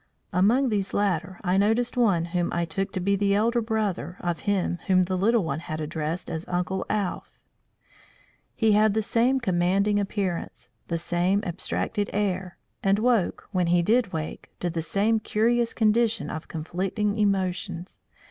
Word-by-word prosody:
Among 235 +9 +3
these 200 -3 -1
latter 185 -3 0
I 180 0 +2
noticed 225 +5 +2
one 200 -9 +3
whom 175 -1 0
I 170 0 0
took 195 +4 -3
to 185 - -1
be 200 +2 +1
the 200 0 +2
elder 235 +3 +2
brother 210 -7 -2
of 175 -1 -2
him 185 -3 0
whom 185 -1 +4
the 185 +1 -2
little 215 +3 +2
one 155 -2 -2
had 155 -1 -5
addressed 155 +2 -3
as 160 0 -4
Uncle 180 +1 -2
Alph. 205 -3 -3 1.2
He 225 -2 +3
had 210 0 +4
the 220 - +1
same 245 +5 +2
commanding 195 0 +2
appearance, 195 -3 -3 0.2
the 170 - -1
same 175 +4 0
abstracted 200 +3 -2
air, 190 -3 -1 0.2
and 195 0 +3
woke, 225 -4 +1
when 180 -3 +1
he 175 0 +3
did 225 +1 +2
wake, 160 -2 -5
to 175 - -1
the 165 0 -2
same 210 +7 +1
curious 230 +2 +1
condition 225 0 +1
of 155 - -6
conflicting 195 +6 -2
emotions. 185 -3 -1
195 Hz, 160 wpm, -26 LUFS, 175-215 Hz, 1.2 s, whom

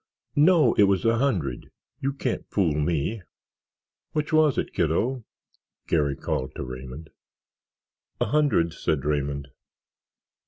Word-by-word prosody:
"No, 150 -4 +5
it 105 - +8
was 100 +2 +1
a 115 0 +3
hundred—you 115 - -3
can't 130 -3 -3
fool 90 -7 +1
me." 80 +7 -1 0.9
"Which 150 0 -2
was 155 -3 +4
it, - - -2
kiddo?" 110 - 0 0.6
Garry 75 -4 +1
called 70 -2 -3
to - - -4
Raymond. 65 +4 -8 1.1
"A - - +2
hundred," 140 - +2
said 70 -3 -1
Raymond. 70 -1 -1
85 Hz, 115 wpm, -25 LUFS, -, 1.1 s, it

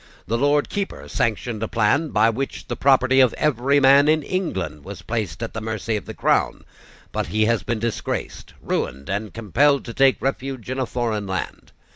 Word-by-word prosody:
The 115 - -1
Lord 145 +4 +2
Keeper 200 -1 -4
sanctioned 115 -3 -2
a 110 - -1
plan 120 +9 +1
by 110 -1 +3
which 135 +4 -4
the - - -3
property 130 -1 +4
of 130 -3 +4
every 140 0 +2
man 140 +1 +6
in 155 0 +3
England 95 - -3
was 95 -3 -9
placed 110 +1 -3
at 115 - -5
the 110 - -4
mercy 110 0 -2
of 105 - -4
the - - -8
Crown; - - +1 0.5
but - - -2
he 110 +1 +1
has 115 0 +1
been 120 - -2
disgraced, 115 0 -4
ruined, 70 +4 -3
and 100 +1 -3
compelled 135 +6 +2
to 115 - -7
take 135 +1 +3
refuge 130 -3 -3
in 130 - -3
a 130 - -1
foreign 110 -5 -2
land. 95 -2 -5
115 Hz, 190 wpm, -22 LUFS, 110-135 Hz, 0.5 s, man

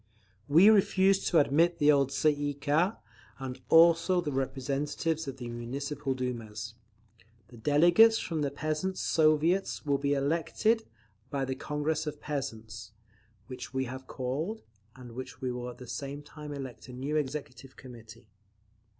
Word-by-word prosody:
"We 165 +8 +6
refuse 195 -2 +3
to 170 - +3
admit 160 +4 +3
the 150 0 +5
old 140 -2 +3
Tsay 140 +3 +2
ee 145 0 -2
kah, 155 +8 +1 0.4
and 130 -1 -7
also 170 +2 +5
the 160 -4 -2
representatives 140 +4 -2
of 135 -1 -5
the 120 - -7
Municipal 135 +4 -4
Dumas. 115 -4 -5 0.8
The 120 - -14
delegates 175 - +5
from 160 -3 -3
the 145 - 0
Peasants' 155 +6 -3
Soviets 160 +4 +2
shall 140 -2 +1
be 140 0 +1
elected 170 +10 +1 0.4
by 140 -2 -1
the 130 - -2
Congress 150 +3 -2
of 150 -1 -5
Peasants, 110 -7 -6 0.5
which 130 +2 -9
we 130 0 0
have 130 +1 -8
called, 150 - -4 0.3
and 125 -2 -11
which 120 0 -8
will 125 -1 -4
at 120 - -10
the 125 - -10
same 140 +3 -6
time 150 0 -10
elect 135 -5 -7
a - - -9
new 135 +4 -3
Executive 135 -3 -4
Committee. 115 -2 -13
140 Hz, 150 wpm, -29 LUFS, 130-155 Hz, 0.8 s, We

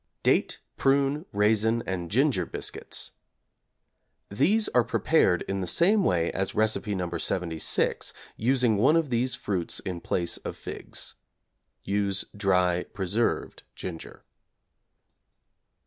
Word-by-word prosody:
=Date, - - +2 0.2
Prune, 140 +4 +2
Raisin, 110 +2 +2
and 90 -3 -3
Ginger 125 - +2
Biscuits= - - -5 1.2
These 180 - +2
are 125 - +4
prepared 115 - +2
in 95 0 -3
the 90 - -3
same 195 - +3
way 85 - +2
as 95 +1 -2
Recipe 110 -1 +1
No. 90 -2 -2
76, 85 -3 -1 0.2
using 120 -2 +2
one 130 +10 +4
of 160 -5 +1
these 125 +2 +1
fruits 95 -8 -2
in 90 -3 -5
place 85 0 -1
of - - -7
figs. - - -6 0.7
(Use 100 -1 0
dry 90 -3 +2
preserved 100 +4 -1
ginger). 85 -3 -8
105 Hz, 115 wpm, -27 LUFS, 90-130 Hz, 1.2 s, are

